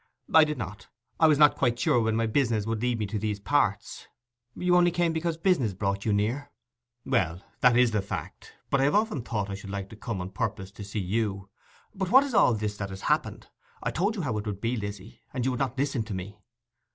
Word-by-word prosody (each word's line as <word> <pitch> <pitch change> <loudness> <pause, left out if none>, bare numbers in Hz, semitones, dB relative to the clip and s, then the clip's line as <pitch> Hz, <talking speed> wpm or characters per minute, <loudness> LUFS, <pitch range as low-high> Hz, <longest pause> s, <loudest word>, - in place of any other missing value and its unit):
'I 160 -1 +8
did 150 0 -3
not. 105 +2 -7 0.3
I 160 - +6
was 150 -2 +4
not 150 0 +6
quite 120 -3 +1
sure 120 +1 +2
when 110 -1 +1
my 115 0 +1
business 115 -3 +1
would 110 -1 -2
lead 125 -1 0
me 110 - -1
to 105 +1 -3
these 105 -1 -2
parts.' 105 -4 0 0.5
'You 180 0 +2
only 175 0 +5
came 170 -1 +1
because 160 0 -1
business 165 - +1
brought 100 0 -2
you 110 - +2
near?' 115 +8 0 0.6
'Well, 95 -9 0 0.2
that 125 -2 +5
is 125 -2 +4
the 105 -2 +1
fact; 100 - -7 0.2
but 140 - +3
I - - +4
have 145 - +2
often 210 - +1
thought 105 -4 -3
I - - -3
should 100 0 -8
like 100 -1 -5
to - - -11
come 110 -2 -5
on 90 +1 -5
purpose 95 -1 -3
to 105 0 -9
see 100 +2 -6
you... 100 0 -2 0.4
But 190 -3 -3
what's 265 +3 +5
all 125 - +5
this 105 -1 -3
that 100 -1 -4
has 95 0 -8
happened? - - -1 0.3
I - - -1
told 200 +6 0
you 190 - -3
how 115 -7 -1
it 105 - -6
would 100 -2 -4
be, 115 +4 -1
Lizzy, 100 -2 -7
and 125 -2 -1
you 130 - +2
would 125 - -3
not 130 -2 -1
listen 135 -3 0
to 105 -3 -5
me. 100 +3 -7
115 Hz, 235 wpm, -27 LUFS, 100-145 Hz, 0.6 s, I